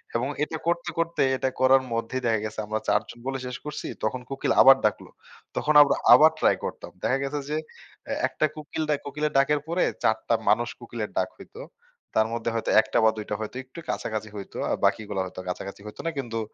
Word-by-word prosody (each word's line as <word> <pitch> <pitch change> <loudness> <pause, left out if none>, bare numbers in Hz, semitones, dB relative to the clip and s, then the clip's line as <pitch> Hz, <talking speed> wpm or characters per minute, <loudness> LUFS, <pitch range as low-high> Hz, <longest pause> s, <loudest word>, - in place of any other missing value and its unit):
এবং 120 +3 +1 0.2
এটা 160 +2 -3
করতে, 170 0 0
করতে 165 0 0 0.2
এটা 130 - 0
করার 130 0 +5
মধ্যেই 115 +3 -2
দেখা 110 -2 +2
গেছে 110 0 -5
আমরা 110 +1 -1
চারজন 110 +3 0
বলে 135 0 -2
শেষ 125 +1 -5
করছি। 150 0 -5 0.2
তখন 125 +4 -2
কোকিল 135 - -1
আবার 135 0 +9
ডাকলো। 105 - -1 0.5
তখন 155 - +2
আমরা 140 - +1 0.2
আবার 155 +1 +8
ট্রাই - - +4
করতাম। - - -6
দেখা 135 - +2
গেছে 140 +2 -2
যে, 150 - 0 0.5
অ্যা - - -2
একটা - - 0
কোকিল 155 +1 -4
ডাক 150 -2 +2
কোকিলের 150 +2 -2
ডাকের 145 +2 +3
পরে 170 +2 +1 0.2
৪ - - +3
টা - - +5
মানুষ - - +3
কোকিলের - - -5
ডাক - - +1
হইত। - - -14 0.6
তার 110 0 +4
মধ্যে 115 0 -2
হয়তো 115 - -2
১ 110 - +2
টা - - +3
বা - - +7
দুই 105 - -5
টা 105 - -1
হয়তো 110 +2 -6
একটু 130 +6 -12
কাছাকাছি 110 -1 -3
হইতো। 100 -2 -8
আর - - 0
বাকিগুলা 105 -3 0
হয়তো 95 0 -8
কাছাকাছি 100 +2 -6
হইত 105 - -9
না। 165 - 0
কিন্তু 115 -4 -3
130 Hz, 210 wpm, -26 LUFS, 110-150 Hz, 0.6 s, আবার